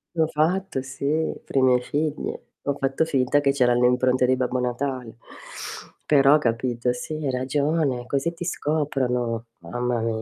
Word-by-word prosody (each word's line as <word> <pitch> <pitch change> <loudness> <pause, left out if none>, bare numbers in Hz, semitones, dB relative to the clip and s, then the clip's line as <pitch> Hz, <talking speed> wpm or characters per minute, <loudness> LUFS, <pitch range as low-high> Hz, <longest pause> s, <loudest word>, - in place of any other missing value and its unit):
L'ho 160 -1 +3
fatto 160 -1 0
sì, 140 +4 -1
per - - -12
i 135 - +5
miei 125 -1 +4
figli. 150 +3 -2 0.3
Ho 140 - 0
fatto 135 +3 +1
finta 135 -2 +2
che 140 -1 +3
c'eran 125 -3 +3
le 125 - +5
impronte 125 0 +2
di 130 - +3
Babbo 125 0 -1
Natale, 125 -1 -3 0.9
però 140 0 +6
capito, 120 -2 0
sì 125 +5 -5
hai 150 -3 -2
ragione, 135 0 0
così 140 +5 -1
ti 170 +1 -6
scoprono. 130 -8 -1
Mamma 120 +7 -2
mia, 110 -1 -1
130 Hz, 160 wpm, -24 LUFS, 125-150 Hz, 0.9 s, però